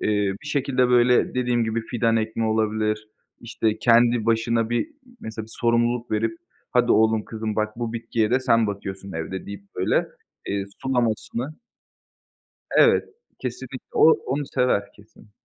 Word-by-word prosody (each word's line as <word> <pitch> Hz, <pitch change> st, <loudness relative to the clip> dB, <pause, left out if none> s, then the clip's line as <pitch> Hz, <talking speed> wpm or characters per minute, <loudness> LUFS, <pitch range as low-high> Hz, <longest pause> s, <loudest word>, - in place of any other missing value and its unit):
eee, -, -, -1 dB, 0.3 s
bir -, -, -11 dB
şekilde 130 Hz, -3 st, +1 dB
böyle 125 Hz, 0 st, +4 dB
dediğim 120 Hz, -2 st, +1 dB
gibi 110 Hz, +1 st, -1 dB
fidan 115 Hz, -2 st, +1 dB
ekmek 110 Hz, 0 st, -1 dB
olabilir, 110 Hz, 0 st, 0 dB, 0.3 s
işte 110 Hz, -2 st, -1 dB
kendi 120 Hz, -1 st, +4 dB
başına 115 Hz, 0 st, +1 dB
bir 120 Hz, -, 0 dB, 0.3 s
mesela 110 Hz, 0 st, -6 dB
bir -, -, -10 dB
sorumluluk 120 Hz, 0 st, +1 dB
verip: 110 Hz, +1 st, 0 dB, 0.3 s
"Hadi 120 Hz, -1 st, +3 dB
oğlum 110 Hz, -1 st, +3 dB
kızım, 110 Hz, -1 st, -4 dB
bak 110 Hz, 0 st, -1 dB
bu 115 Hz, -1 st, -3 dB
bitkiye 115 Hz, -1 st, -1 dB
de 130 Hz, -, +3 dB
sen 115 Hz, -4 st, +3 dB
bakıyorsun 100 Hz, -1 st, -6 dB
evde." 80 Hz, +4 st, -5 dB
deyip 100 Hz, 0 st, -8 dB
böyle, 90 Hz, -, +1 dB, 0.4 s
eee, 100 Hz, -1 st, -2 dB, 0.2 s
sulamasını 125 Hz, +2 st, -1 dB, 1.2 s
Evet, -, -, +5 dB, 0.3 s
kesinlikle 130 Hz, +1 st, -6 dB
o 160 Hz, -, +7 dB
onu 140 Hz, +3 st, -1 dB
sever 100 Hz, -5 st, +1 dB
kesin. 105 Hz, +1 st, -20 dB
115 Hz, 145 wpm, -24 LUFS, 110-120 Hz, 1.2 s, o